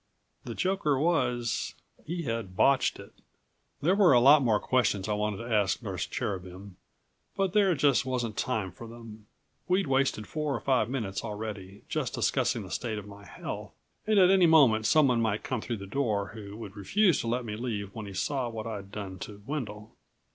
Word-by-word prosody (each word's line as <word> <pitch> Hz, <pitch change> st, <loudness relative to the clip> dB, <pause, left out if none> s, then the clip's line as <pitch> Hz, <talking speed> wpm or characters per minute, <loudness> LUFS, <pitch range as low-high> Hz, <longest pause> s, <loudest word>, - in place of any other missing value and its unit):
The -, -, -5 dB
joker 185 Hz, -7 st, +1 dB
was 125 Hz, -7 st, 0 dB, 0.3 s
he 170 Hz, +1 st, -3 dB
had 115 Hz, -7 st, -4 dB
botched 135 Hz, -1 st, +3 dB
it. -, -, -12 dB, 0.7 s
There 175 Hz, +5 st, +4 dB
were 195 Hz, -7 st, +5 dB
a 120 Hz, -, +7 dB
lot 140 Hz, +4 st, +7 dB
more 115 Hz, -5 st, +2 dB
questions 105 Hz, -7 st, +1 dB
I 105 Hz, -, 0 dB
wanted 105 Hz, -1 st, -1 dB
to 115 Hz, +1 st, -4 dB
ask 100 Hz, -2 st, +1 dB
Nurse -, -, -3 dB
Cherubin 95 Hz, 0 st, -5 dB, 0.6 s
but 195 Hz, -2 st, 0 dB
there 195 Hz, -4 st, +4 dB
just 140 Hz, -2 st, +3 dB
wasn't 125 Hz, -4 st, -2 dB
time 100 Hz, -4 st, -1 dB
for 115 Hz, -, -10 dB
them. 115 Hz, -2 st, -12 dB, 0.4 s
We'd 185 Hz, +2 st, +2 dB
wasted 135 Hz, -6 st, +1 dB
four 150 Hz, 0 st, -2 dB
or -, -, -3 dB
five 130 Hz, -5 st, +1 dB
minutes 110 Hz, -8 st, -3 dB
already, 105 Hz, -2 st, -6 dB
just -, -, -2 dB
discussing -, -, 0 dB
the -, -, -10 dB
state 110 Hz, -3 st, -3 dB
of 105 Hz, -, -6 dB
my 100 Hz, 0 st, -12 dB
health, 90 Hz, -, -7 dB, 0.3 s
and 215 Hz, -1 st, +3 dB
at 185 Hz, -1 st, +7 dB
any 190 Hz, -3 st, +5 dB
moment 125 Hz, -9 st, +5 dB
someone 135 Hz, -7 st, +4 dB
might 110 Hz, -2 st, 0 dB
come 130 Hz, -4 st, -2 dB
through 120 Hz, 0 st, -4 dB
the 100 Hz, -, -8 dB
door 105 Hz, -3 st, -1 dB
who 105 Hz, -2 st, -9 dB
would 105 Hz, -3 st, -9 dB
refuse 180 Hz, -, +2 dB
to -, -, -5 dB
let 120 Hz, +1 st, -1 dB
me 105 Hz, -2 st, -4 dB
leave 105 Hz, -4 st, -4 dB
when 110 Hz, -2 st, -7 dB
he 100 Hz, -, -8 dB
saw 130 Hz, +4 st, -1 dB
what 110 Hz, -1 st, -6 dB
I'd 100 Hz, -3 st, -6 dB
done 95 Hz, -3 st, -6 dB
to 100 Hz, +2 st, -9 dB
Wendel. 115 Hz, -7 st, -5 dB
115 Hz, 190 wpm, -29 LUFS, 105-140 Hz, 0.7 s, a